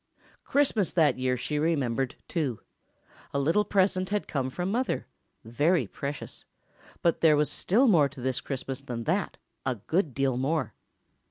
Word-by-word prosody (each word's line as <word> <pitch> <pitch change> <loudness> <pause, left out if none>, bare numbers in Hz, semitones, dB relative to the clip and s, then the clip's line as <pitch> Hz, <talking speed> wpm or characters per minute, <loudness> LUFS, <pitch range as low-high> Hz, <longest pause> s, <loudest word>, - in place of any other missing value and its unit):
Christmas 265 -9 +2
that 150 -7 +3
year 130 0 +1
she 150 +4 -2
remembered, 135 -5 0
too. 145 -9 -2 0.8
A - - +2
little 165 +9 +3
present 185 -2 +1
had 205 0 -1
come 135 -3 -1
from 180 +7 -3
Mother—very 170 - -1
precious—but 145 +3 -5
there 155 -2 +6
was 150 0 +2
still 240 +9 +3
more 160 -10 +5
to 135 - -12
this 130 0 -1
Christmas 135 0 -4
than 120 -4 -5
that—a 130 +2 -3
good 155 - -1
deal 135 -2 +1
more. 140 +2 -1
145 Hz, 140 wpm, -28 LUFS, 130-180 Hz, 0.8 s, there